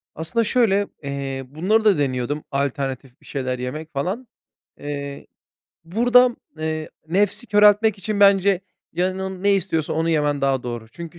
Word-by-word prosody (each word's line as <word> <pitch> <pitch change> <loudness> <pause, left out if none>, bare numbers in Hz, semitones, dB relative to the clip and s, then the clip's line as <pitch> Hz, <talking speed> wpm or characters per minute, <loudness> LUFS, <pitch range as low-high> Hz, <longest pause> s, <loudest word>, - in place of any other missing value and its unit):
Aslında 165 +9 0
şöyle, 205 -4 +2 0.2
eee, 135 -1 -4
bunları 190 - +1
da 200 -6 +5
deniyordum, 140 +1 -1
alternatif 135 -2 -3
bir - - -21
şeyler 130 -3 -3
yemek, 155 +6 -6
falan. 190 - -3 0.5
Eee, 140 -1 -6 0.6
buradan, 240 +6 +4 0.2
eee, 155 0 -3 0.2
nefsi 205 +6 +1
köreltmek 210 0 +5
için 205 +1 -3
bence 195 -1 +5 0.3
canın 185 +1 -2
ne 200 0 +4
istiyorsa 165 -5 -1
onu 165 +1 0
yemen 150 -2 +1
daha 135 -2 +1
doğru. 120 -2 -6
Çünkü 170 +4 -10
165 Hz, 140 wpm, -22 LUFS, 140-200 Hz, 0.6 s, da